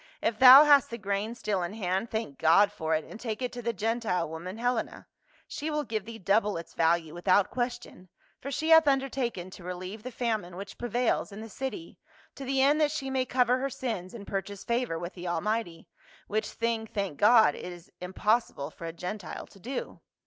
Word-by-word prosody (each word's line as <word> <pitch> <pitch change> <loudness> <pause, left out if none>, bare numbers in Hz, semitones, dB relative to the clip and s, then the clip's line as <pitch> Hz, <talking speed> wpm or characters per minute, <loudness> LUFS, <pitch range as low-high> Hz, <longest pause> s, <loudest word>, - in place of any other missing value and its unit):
" - - -29
If 220 -1 0
thou 260 +3 +11
hast 290 -3 +5
the 235 - -5
grain 205 +2 -2
still 210 -5 -1
in 175 +4 -4
hand, 190 +1 -1
thank 220 -11 -4
God 195 +6 +5
for 160 -6 -1
it 155 - -2
and - - -11
take 220 -3 -4
it 250 -1 -2
to 245 - -7
the 235 0 -1
Gentile 220 -4 -1
woman, 170 +5 -7
Helena 245 0 -2 0.2
;* - - -32
she 300 +2 -4
will 300 -1 -1
give 215 -7 -3
thee 230 0 -8
double 205 0 +1
its 165 - -9
value 165 -1 +1
without 185 +3 +2
question, 240 -7 -4 0.3
for 275 - -6
she 310 +4 -2
hath 320 -2 +7
undertaken 260 -9 0
to 185 - -12
relieve 185 +4 -6
the 250 - -6
famine 220 -7 -2
which 195 +2 -9
prevails 240 -2 0
in 200 - -9
the 225 +1 -8
city, 270 - -6 0.3
to 275 - -9
the 265 0 +1
end 295 +3 +4
that 300 - +4
she 275 -3 -4
may 260 -1 +1
cover 250 0 +2
her 275 +1 -1
sins 225 -7 -4
and 205 -3 -9
pur 195 -1 -1
chase 200 0 -10
favor 235 -7 -1
with 175 +3 -6
the 180 -1 -7
Almighty 175 0 -2 0.2
— - - -26
which 215 +1 -1
thing, 230 -1 -2
thank 195 -8 -4
God, 220 +1 +6
it 180 - -7
is 175 -1 -13
impossible 185 -5 0
for 165 - -8
a 165 - -5
Gentile 180 +1 -6
to 195 - -19
do." 250 +7 -6
220 Hz, 215 wpm, -28 LUFS, 180-245 Hz, 0.3 s, thou